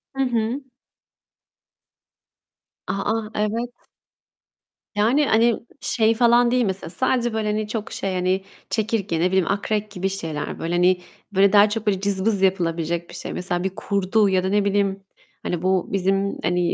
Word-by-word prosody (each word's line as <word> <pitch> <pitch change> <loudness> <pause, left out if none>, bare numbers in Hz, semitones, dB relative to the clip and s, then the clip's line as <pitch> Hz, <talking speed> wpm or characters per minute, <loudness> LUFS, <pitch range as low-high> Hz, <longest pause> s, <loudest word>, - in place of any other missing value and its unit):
Hı 270 - -1
hı. 240 +1 -1 2.3
A! - - -1
A! 215 +2 -1
Evet. 220 +3 -1 1.3
Yani, 240 +8 +3
hani, 230 +1 +3 0.2
şey 225 -1 +2
falan 240 +1 +4
değil 250 -1 +2
mesela, 190 -4 -3
sadece 240 +4 0
böyle, 220 -1 -1
hani, 210 0 -1
çok 215 -1 -4
şey, 195 -1 -3
hani, 185 +1 0 0.3
çekirge, 210 -6 -1
ne 175 - +3
bileyim, 190 -1 +1
akrep 210 +1 -1
gibi 190 0 -2
şeyler. 160 -6 -4
Böyle, 165 +1 -3
hani, 180 +1 +3 0.3
böyle 195 +1 +4
daha 205 +1 +7
çok 220 +1 -3
böyle 195 -2 +1
cızbız 200 +1 +1
yapılabilecek 170 -3 0
bir - - -10
şey. - - -5
Mesela 180 -1 -2
bir 190 0 -3
kurdu 200 +2 +1
ya 185 -1 +2
da 190 - 0
ne 205 0 +2
bileyim, 195 -1 0 0.4
hani, 175 -2 -2
bu 185 0 +1
bizim, 195 +1 0
hani, 180 +1 +1
200 Hz, 160 wpm, -22 LUFS, 185-220 Hz, 2.3 s, daha